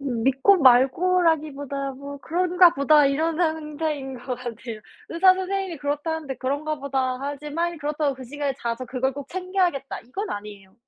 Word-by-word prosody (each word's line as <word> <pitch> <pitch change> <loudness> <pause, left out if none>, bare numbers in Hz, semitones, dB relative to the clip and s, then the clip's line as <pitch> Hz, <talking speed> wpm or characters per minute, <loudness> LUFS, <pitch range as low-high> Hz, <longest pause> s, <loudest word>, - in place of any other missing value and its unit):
음 250 -5 -3
믿고 270 +10 +5
말고라기보다 285 0 +3
뭐 280 +2 -8
'그런가 355 +3 +4
보다.' 295 +2 +5
이런 315 +4 0
상태인 305 -4 -2
것 250 +1 -4
같아요. 235 -2 -7 0.3
의사 370 +3 +5
선생님이 380 -1 -3
그렇다는데 295 0 -3
'그런가 290 +4 -2
보다.' 265 -2 -1
하지 285 +1 -5
막 335 +3 0
이 - - -9
그렇다고 295 -1 -1
'그 260 0 -10
시간에 285 +2 -3
자서 235 +2 -3
그걸 260 +2 -1
꼭 280 0 -8
챙겨야겠다.' 365 -6 -1
이건 390 - -6
아니에요. 205 -2 -8
285 Hz, 375 characters per minute, -24 LUFS, 265-325 Hz, 0.3 s, 믿고